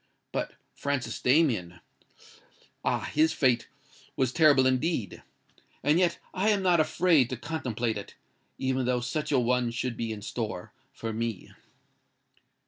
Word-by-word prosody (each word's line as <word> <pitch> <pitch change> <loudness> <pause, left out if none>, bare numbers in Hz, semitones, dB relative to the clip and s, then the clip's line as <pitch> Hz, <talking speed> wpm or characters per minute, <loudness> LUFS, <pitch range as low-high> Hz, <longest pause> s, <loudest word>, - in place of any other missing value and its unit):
But - - -3 0.2
Francis 140 -2 -3
Damien—ah! 125 - -2
his 155 +2 +3
fate 125 -4 +2 0.5
was 130 -2 0
terrible 145 -5 +5
indeed! 130 - 0 0.6
And 150 +4 +4
yet 175 -2 +2 0.2
I 195 +3 +1
am 205 -2 +2
not 180 -3 +4
afraid 155 -4 +3
to 130 - -3
contemplate 120 -6 -2
it—even 130 +5 -5
though 125 -1 +1
such 150 +6 -2
a 140 - +4
one 125 0 +2
should 120 +1 -3
be 115 -1 -3
in 105 -2 -6
store 110 -2 -4 0.2
for 115 -1 -5
me." 115 -3 -4
130 Hz, 130 wpm, -28 LUFS, 115-155 Hz, 0.6 s, terrible